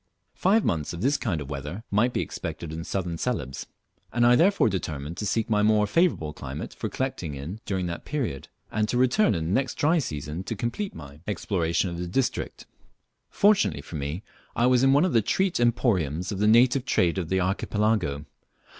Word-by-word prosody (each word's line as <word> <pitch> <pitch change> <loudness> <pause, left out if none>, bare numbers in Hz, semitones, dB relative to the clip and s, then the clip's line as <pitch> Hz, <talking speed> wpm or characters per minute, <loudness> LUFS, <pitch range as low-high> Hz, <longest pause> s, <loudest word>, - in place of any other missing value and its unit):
Five 205 +4 +2
months 75 -2 -1
of 85 - -6
this 135 +5 +2
kind 100 - -1
of 70 +1 -7
weather 75 +9 -5
might 110 +5 +3
be - - -1
expected 80 -2 -5
in 80 +1 -5
Southern 85 -3 -3
Celebes, 70 - -3 0.4
and 120 0 +2
I 120 0 +6
therefore 190 - +4
determined 80 -6 -3
to 105 - -2
seek 115 +3 0
some 105 -2 +2
more 105 -1 +4
favourable 105 - +1
climate - - -7
for - - -4
collecting 90 - -3
in 80 +10 -6
during 95 -2 -1
that 85 -1 -5
period, 120 - -3 0.2
and 105 0 0
to 120 - 0
return 125 - +3
in 80 -2 -2
the 85 - -2
next 130 +6 0
dry 160 +3 +3
season 75 - -4
to 115 - -3
complete 120 - -3
my 70 -1 -10
exploration 90 -3 0
of 85 - -6
the 90 - -3
district. 125 +9 -2 0.6
Fortunately 110 - +3
for 80 - -9
me 75 +6 -4 0.3
I 120 - +2
was 125 -1 +4
in 135 0 +5
one 145 +5 +5
of 185 - 0
the 115 - +5
treat 190 - 0
emporiums 95 - +1
of 100 - -4
the 105 - +3
native 120 +4 +5
trade 95 -8 +1
of 85 -3 -4
the 95 - +1
archipelago. 95 -5 0
105 Hz, 200 wpm, -26 LUFS, 80-125 Hz, 0.6 s, I